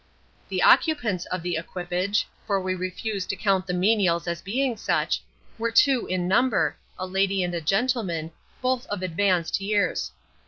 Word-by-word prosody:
The - - 0
occupants 235 - +3
of 185 -2 -3
the 175 -2 -1
equipage 180 +4 -1 0.2
for 200 -2 +2
we 185 0 -1
refuse 185 +2 -3
to - - -2
count 195 -2 +1
the 180 - -1
menials 180 -3 +2
as 170 0 -2
being 245 +6 -1
such 220 - 0 0.4
were 230 +1 0
two 255 +2 +4
in 180 -1 -1
number, 240 +4 +2 0.2
a 185 - -3
lady 190 0 +1
and 175 -2 -3
gentleman, 195 -7 0 0.3
both 255 +1 0
of 200 -2 -4
advanced 185 0 +1
years. 200 -1 0
195 Hz, 155 wpm, -25 LUFS, 180-220 Hz, 0.4 s, two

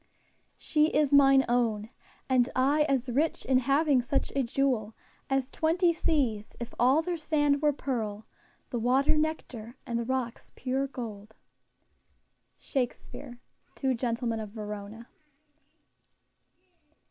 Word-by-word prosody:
"She 305 -1 +2
is 295 -2 +1
mine 270 -1 +6
own; 230 -2 0 0.4
And 255 -1 +3
I 285 +4 +3
as 265 -2 +1
rich 285 +7 0
in 255 -1 +3
having 275 +1 +3
such 265 +3 -1
a 275 - +2
jewel 240 -4 0 0.3
As 270 -1 0
twenty 335 +2 +2
seas, 250 -10 -1
if 235 0 -6
all 265 +6 +4
their 350 0 -2
sand 295 -2 +1
were 300 -1 +4
pearl, 225 -7 -4 0.5
The 240 - -1
water 270 +6 +3
nectar, 270 -7 -3
and 235 -2 -2
the - - -1
rocks 255 -1 -4
pure 265 +1 -1
gold." 220 -5 -8 1.2
SHAKESPEARE, 250 -1 -4 0.4
_Two 265 -2 0
Gentlemen 235 -1 -2
of 215 -1 -6
Verona. 210 +1 -7
260 Hz, 125 wpm, -29 LUFS, 235-285 Hz, 1.2 s, mine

